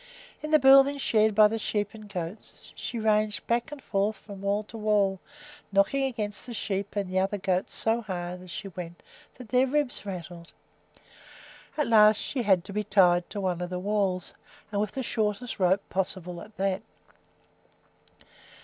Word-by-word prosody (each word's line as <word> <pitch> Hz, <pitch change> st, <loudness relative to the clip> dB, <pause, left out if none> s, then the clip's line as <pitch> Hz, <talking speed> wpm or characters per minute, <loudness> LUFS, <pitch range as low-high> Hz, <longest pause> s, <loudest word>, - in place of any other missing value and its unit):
In 305 Hz, -, -5 dB
the 310 Hz, -, +6 dB
building 275 Hz, +1 st, +6 dB
shared 220 Hz, -5 st, +2 dB
by 215 Hz, 0 st, +8 dB
the 225 Hz, +1 st, -3 dB
sheep 205 Hz, -1 st, -2 dB
and 215 Hz, -2 st, -11 dB
goats 180 Hz, +1 st, -7 dB
she 240 Hz, -, -5 dB
ranged 215 Hz, -2 st, +1 dB
back 240 Hz, +6 st, 0 dB
and 290 Hz, -2 st, -9 dB
forth 205 Hz, +1 st, 0 dB
from 200 Hz, -2 st, -11 dB
wall 200 Hz, +1 st, 0 dB
to 215 Hz, -, -13 dB
wall, 205 Hz, -3 st, +1 dB, 0.5 s
knocking 200 Hz, +8 st, +2 dB
against 215 Hz, -4 st, -4 dB
the 240 Hz, -, -6 dB
sheep 200 Hz, -1 st, -3 dB
and 200 Hz, -2 st, -1 dB
the 185 Hz, +1 st, 0 dB
other 195 Hz, +2 st, 0 dB
goats 185 Hz, -1 st, -1 dB
so 225 Hz, +1 st, +1 dB
hard 180 Hz, -3 st, -5 dB
as 185 Hz, -, -12 dB
she 195 Hz, +3 st, -6 dB
went 175 Hz, -2 st, -9 dB, 0.3 s
that 250 Hz, -3 st, -12 dB
their 255 Hz, +1 st, +3 dB
ribs 290 Hz, -1 st, +1 dB
rattled. 175 Hz, -3 st, -8 dB, 1.2 s
At 300 Hz, -, +2 dB
last 215 Hz, -2 st, +6 dB
she 265 Hz, -, -2 dB
had 190 Hz, -6 st, +3 dB
to 200 Hz, -, -8 dB
be 210 Hz, +1 st, -1 dB
tied 175 Hz, -4 st, +3 dB
to 205 Hz, -, -5 dB
one 180 Hz, -2 st, -1 dB
of 175 Hz, -, -3 dB
the 180 Hz, -, -3 dB
walls, 190 Hz, -2 st, -1 dB, 0.4 s
and 205 Hz, -1 st, 0 dB
with 210 Hz, -1 st, -2 dB
the 265 Hz, -, -3 dB
shortest 220 Hz, 0 st, -2 dB
rope 190 Hz, +2 st, +2 dB
possible 180 Hz, -2 st, -3 dB
at 215 Hz, -, -14 dB
that. 195 Hz, 0 st, 0 dB
205 Hz, 175 wpm, -27 LUFS, 190-225 Hz, 1.2 s, by